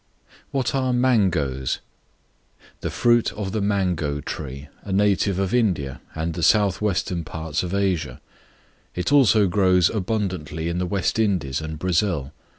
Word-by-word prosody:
What 130 Hz, -4 st, -1 dB
are 130 Hz, -2 st, +1 dB
Mangoes? 90 Hz, -, +1 dB, 1.0 s
The -, -, -3 dB
fruit 120 Hz, -1 st, +2 dB
of 100 Hz, -2 st, -4 dB
the 110 Hz, -, -1 dB
Mango 90 Hz, -8 st, 0 dB
Tree, 70 Hz, -2 st, -6 dB
a 100 Hz, -, -8 dB
native 100 Hz, -1 st, +2 dB
of 95 Hz, +1 st, -1 dB
India 75 Hz, -, 0 dB
and 80 Hz, +1 st, -2 dB
the 85 Hz, -, -5 dB
south 100 Hz, +1 st, +3 dB
western 90 Hz, -4 st, -1 dB
parts 80 Hz, 0 st, -3 dB
of 90 Hz, +1 st, -3 dB
Asia; 85 Hz, -9 st, -1 dB, 0.8 s
it 90 Hz, +9 st, -2 dB
also 115 Hz, -7 st, +5 dB
grows 90 Hz, -1 st, +3 dB
abundantly 90 Hz, -7 st, -2 dB
in 85 Hz, +1 st, -2 dB
the 90 Hz, -, -1 dB
West 100 Hz, +3 st, -1 dB
Indies 90 Hz, -, 0 dB
and 80 Hz, 0 st, -5 dB
Brazil. 85 Hz, -5 st, 0 dB
90 Hz, 145 wpm, -23 LUFS, 80-105 Hz, 1.0 s, also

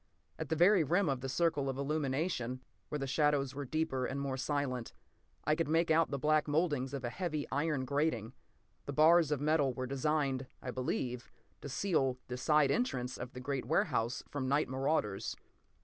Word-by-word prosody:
At -, -, -4 dB
the 160 Hz, -, +1 dB
very 180 Hz, +2 st, +5 dB
rim 175 Hz, +6 st, +2 dB
of 135 Hz, -2 st, -1 dB
the 135 Hz, -, -3 dB
circle 145 Hz, -1 st, +1 dB
of 135 Hz, -, -3 dB
illumination, 140 Hz, -3 st, -1 dB, 0.3 s
where 150 Hz, -, -2 dB
the 135 Hz, -, -3 dB
shadows 140 Hz, -1 st, +1 dB
were 140 Hz, +1 st, -5 dB
deeper 135 Hz, -2 st, -1 dB
and 140 Hz, -, -3 dB
more 140 Hz, -1 st, -2 dB
silent, 130 Hz, -3 st, -2 dB, 0.5 s
I 155 Hz, -, +2 dB
could 165 Hz, 0 st, 0 dB
make 165 Hz, +1 st, +2 dB
out 160 Hz, 0 st, +4 dB
the 140 Hz, -, -2 dB
black 155 Hz, +2 st, +2 dB
mouldings 145 Hz, -4 st, 0 dB
of 135 Hz, -, -5 dB
a 120 Hz, -, -2 dB
heavy 155 Hz, -4 st, -2 dB
iron 145 Hz, -2 st, 0 dB
grating. 130 Hz, -5 st, 0 dB, 0.5 s
The 140 Hz, -, -3 dB
bars 160 Hz, +2 st, +6 dB
of 150 Hz, -, +1 dB
metal 145 Hz, -3 st, +2 dB
were 130 Hz, -, -3 dB
designed, 135 Hz, -1 st, 0 dB
I 125 Hz, -, -5 dB
believe, 125 Hz, -1 st, -3 dB, 0.3 s
to 145 Hz, -, -6 dB
seal 135 Hz, -3 st, +1 dB
the 125 Hz, -, -3 dB
side 150 Hz, +1 st, +3 dB
entrance 130 Hz, -, -1 dB
of 125 Hz, +1 st, -7 dB
the 125 Hz, -, -7 dB
great 135 Hz, 0 st, -3 dB
warehouse 120 Hz, +5 st, 0 dB
from 140 Hz, -3 st, -3 dB
night 145 Hz, +3 st, +2 dB
marauders. 130 Hz, -6 st, -1 dB
140 Hz, 185 wpm, -33 LUFS, 130-155 Hz, 0.5 s, bars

